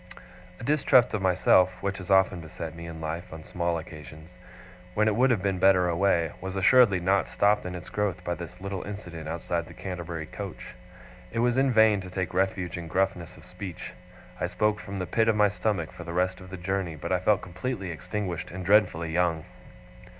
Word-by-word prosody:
A - - -9
distrust 140 -3 +4
of 105 - -1
myself, 90 0 +4
which 100 +1 -3
has 90 - -9
often 95 -2 +4
beset 80 0 -7
me 85 0 -8
in 80 -1 -8
life 80 +3 -5
on 80 0 -8
small 85 0 -1
occasions, 80 +1 -10 0.6
when 110 +1 +3
it 105 - +2
would 130 +4 +4
have 110 -7 +1
been 95 -2 0
better 90 -1 +5
away, 85 -2 +2
was 95 +1 -5
assuredly 100 0 +5
not 95 +3 +2
stopped 105 -2 +2
in 90 - -5
its 90 0 -8
growth 100 -3 -2
by 85 - -1
this 85 +1 -8
little 95 -1 -4
incident 90 -6 -7
outside 85 0 -2
the - - -12
Canterbury 85 -3 -5
coach. - - -8 0.6
It 115 - -6
was 120 +1 +2
in 135 0 +3
vain 110 -3 +5
to 95 - -8
take 95 -1 -3
refuge 90 -2 -1
in 85 - -7
gruffness 90 -1 -1
of - - -15
speech. 90 -1 -8 0.5
I - - 0
spoke 105 +3 0
from 100 -1 -7
the 90 - -2
pit 115 +4 +1
of 110 - +3
my 105 -1 +4
stomach 100 -5 -2
for - - -9
the 85 0 -6
rest 90 +1 0
of 95 - -11
the 95 - -7
journey, 90 -2 -2
but 75 - -6
I 90 - +2
felt 105 +2 +2
completely 95 +1 -4
extinguished, 90 +1 -4
and 90 0 -7
dreadfully 95 -5 +3
young. 85 -2 +1
90 Hz, 205 wpm, -27 LUFS, 85-100 Hz, 0.6 s, better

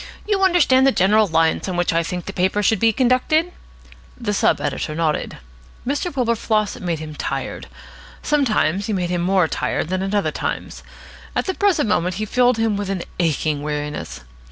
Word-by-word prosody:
"You 410 -2 0
understand 340 -8 +4
the - - +5
general 210 +1 +3
lines 165 +2 +1
on 180 - -3
which 175 -1 +1
I 165 - +2
think 175 +1 -4
the 195 - -6
paper 190 +3 +1
should 220 0 +2
be 225 +2 +4
conducted?" 260 - +2 0.7
The 215 -4 -2
sub - - +2
editor 150 +1 -3
nodded. 160 -2 -1 0.5
Mr. 290 +7 -1
Wilberfloss 230 -5 0
made 175 -2 -2
him 155 0 -7
tired. - - -4 0.6
Sometimes 215 - +1
he 220 - -1
made 180 -2 -1
him 175 -1 0
more 185 -1 +2
tired 155 - -2
than 185 0 -1
at 195 +2 -2
other 205 - +1
times. - - -4 0.5
At - - 0
the 380 - -1
present 370 - +2
moment 180 -2 0
he 215 +3 -2
filled 245 +2 +2
him 225 -2 +1
with 200 -1 -3
an 190 -3 -2 0.2
aching 155 -3 0
weariness. 150 - -4
200 Hz, 180 wpm, -21 LUFS, 170-245 Hz, 0.7 s, the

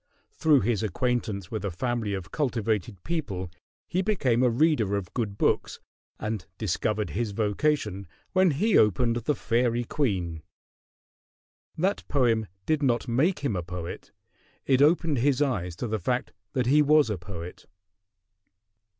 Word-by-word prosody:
Through 150 -4 +3
his 110 0 0
acquaintance 110 -4 -1
with 110 -3 -3
a 100 - -1
family 110 +2 -2
of 90 -4 -7
cultivated 115 - -1
people 100 - -3 0.4
he 180 - 0
became 145 - +1
a 125 - +4
reader 120 -6 +2
of 95 -3 -6
good 105 -5 -2
books, - - 0 0.4
and 105 -3 -3
discovered 105 +1 -1
his 110 -1 -2
vocation 105 - 0 0.2
when 185 -1 +4
he 190 +9 +3
opened 115 +3 +3
the 130 +5 0
"Faerie 120 0 +1
Queene." 95 - -1 1.4
That 190 +5 0
poem 115 -6 +2 0.2
did 155 -1 +1
not 125 -3 +1
make 145 +7 +1
him 120 -8 0
a 90 - -1
poet: 85 0 -7 0.5
it 135 -1 +3
opened 155 -2 +3
his 135 +1 +2
eyes 100 - 0
to 120 - -4
the 110 0 -1
fact 125 +7 -1 0.2
that 125 -2 +1
he 145 +5 +5
was 150 -4 +4
a 100 - -3
poet. 90 -1 -8
115 Hz, 145 wpm, -27 LUFS, 100-145 Hz, 1.4 s, he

